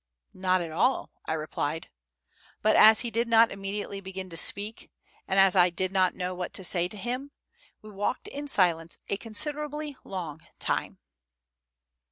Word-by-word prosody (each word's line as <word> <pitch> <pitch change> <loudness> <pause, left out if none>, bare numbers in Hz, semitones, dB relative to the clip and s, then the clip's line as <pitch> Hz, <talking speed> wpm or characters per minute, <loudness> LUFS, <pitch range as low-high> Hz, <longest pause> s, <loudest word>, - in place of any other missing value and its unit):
"Not 185 -1 +1
at 165 -2 -5
all," 250 +11 +1 0.2
I - - 0
replied; 155 0 -3 0.7
but 215 - +4
as 220 +1 +8
he 235 - -4
did 230 +1 0
not 230 0 +5
immediately 195 0 -5
begin 190 -1 -7
to - - -6
speak, 205 +5 0 0.4
and 195 - +2
as 195 -1 +6
I 180 -1 +6
did 185 +2 -2
not 185 -2 +2
know 180 0 -3
what 180 0 -5
to 190 - -2
say 175 -1 +2
to 210 - -8
him, 250 +6 -4 0.5
we 215 - -11
walked 205 +5 -2
in 290 +1 -6
silence 170 - +1
a 200 - 0
considerably 295 +5 -2
long 165 -5 -6 0.2
time. - - -2
195 Hz, 165 wpm, -28 LUFS, 180-230 Hz, 0.7 s, as